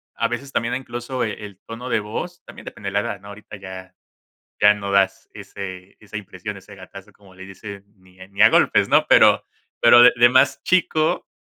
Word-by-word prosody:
a - - 0
veces 140 -1 -6
también 115 0 -2
incluso 125 0 -5
el 105 -3 -7
tono 120 +3 -8
de 110 - +1
voz, 145 +12 -7
también - - -13
depende 100 - -9
de - - -11
la 100 - +2
edad, 100 - -5
¿no? 100 - -14
Ahorita 105 +1 -12
ya 95 -1 -11 0.7
ya 105 0 +6
no 100 -1 -6
das 95 -1 0
ese 95 -1 -10
esa 105 -1 -9
impresión, 100 0 -8
ese 100 +1 -15
gatazo, 100 +2 -14
como 95 -2 -21
le 95 - -11
dice, 100 +1 -11
ni 95 -1 -24
ni 100 +1 -4
a 110 - +8
golpes, - - +2
¿no? - - +3
pero - - +5 0.4
pero 120 - +7
de - - +8
de 120 0 +5
más 130 +2 +2
chico, 160 -3 0
105 Hz, 200 wpm, -21 LUFS, 95-120 Hz, 0.7 s, a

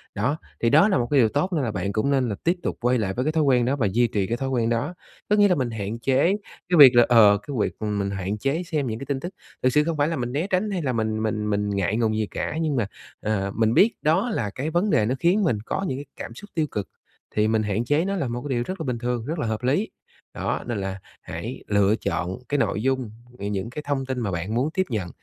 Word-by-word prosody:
Đó, 125 +9 0 0.2
thì 115 - +3
đó 200 - +6
là 190 - +3
một 120 - 0
cái 145 - +5
điều 115 -3 +5
tốt 150 - -1
nên 155 -5 +1
là 115 - -1
bạn 100 0 -3
cũng 115 +7 +1
nên 130 -3 +2
là 100 - -2
tiếp 170 +2 +2
tục - - -2
quay 125 +1 +2
lại 100 -4 -1
với 125 +4 -2
cái 155 - +2
thói 160 -1 +2
quen 125 -4 +3
đó 130 +3 +1
và 115 -8 +1
duy 120 +4 +3
trì 105 -4 -1
cái 120 +3 -1
thói 135 0 -2
quen 120 -3 +1
đó. 120 +8 -1 0.4
Có 210 - +4
nghĩa 205 -1 +6
là 180 - +3
mình 130 -5 -1
hạn 110 +1 -4
chế 130 +3 +2 0.5
cái 180 - +3
việc 135 -4 +10
là, 120 -1 +7
ờ, 105 -4 +7
cái 140 - -4
việc, - - 0
ừm, 105 -1 -2
mình 100 0 -1
hạn 95 +2 -3
chế 140 +9 -1
xem 155 -6 -2
những 110 0 -3
cái - - -6
tin 140 -1 -2
tức, 175 +7 -6 0.3
thực 130 - +5
sự 150 - +4
không 160 0 -2
phải 145 - +2
là 165 - -1
mình 120 -3 -3
né 155 +8 -1
tránh 190 +2 0
hay 185 -3 -1
là 130 -4 -1
mình 110 -1 -1
mình 105 -1 -1
mình 105 0 0
ngại 100 0 0
ngùng 110 -2 +1
gì 110 -1 0
cả, 155 - -3
nhưng 155 -3 0
mà, 115 -6 0 0.3
ờ, 100 -2 -1
mình 110 0 +2
biết 215 - +5
đó 160 +10 +2
là 115 - -1
cái 140 +4 -2
vấn 175 +6 +1
đề 110 - +3
nó 125 +4 0
khiến 185 +5 +3
mình 125 - +2
có 190 +9 -2
những 130 - -2
cái 145 - -7
cảm - - -7
xúc 205 0 -11
tiêu 160 -2 0
cực, 100 -3 -4 0.5
thì 105 0 +3
mình 110 -1 +2
hạn 105 +3 -1
chế 145 +6 +2
nó 195 +1 -1
là 170 -9 -1
một 120 +1 -4
cái 145 - -6
điều 120 - 0
rất 185 0 -5
là 160 - -3
bình 125 -2 -1
thường, 120 -2 -2
rất 160 +4 -3
là 115 - -1
hợp 110 +2 -3
lý. 145 - +1 0.4
Đó, - - -2
nên 120 -3 -2
là 95 0 -4 0.2
hãy - - -6
lựa 100 0 +3
chọn 95 -4 -3
cái 145 - +1
nội 105 -4 0
dung, 130 -3 0 0.3
ừ, 100 - -5
những 100 +1 -2
cái 135 +5 -6
thông 135 -2 -1
tin 130 -1 -3
mà 105 -5 -2
bạn 90 +5 -3
muốn 130 +5 +1
tiếp 190 - +2
nhận, 105 -8 -2
120 Hz, 295 wpm, -24 LUFS, 110-150 Hz, 0.5 s, việc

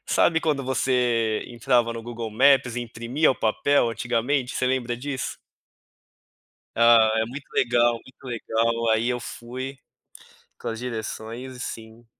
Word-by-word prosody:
Sabe, 165 -1 +3
quando 145 -5 0
você 125 -4 +1
entrava 120 0 +1
no 115 0 -6
Google 115 -1 -6
Maps 130 +1 +4
e - - -1
imprimia 120 +6 0
o - - 0
papel 120 +4 +2
antigamente, 125 +3 -1
você 130 - 0
lembra 125 -2 0
disso? 130 +1 -4 1.4
Ah, 115 -1 +6
é - - -2
muito 135 +4 -8
legal, 120 -1 +3
muito 130 +4 -13
legal. 115 -1 -1
Aí 110 +2 +2
eu 125 0 -2
fui 130 +4 -7 0.8
com - - -5
as 115 - -4
direções 120 +1 -6
e - - -11
sim 115 0 -8
120 Hz, 145 wpm, -24 LUFS, 115-130 Hz, 1.4 s, Ah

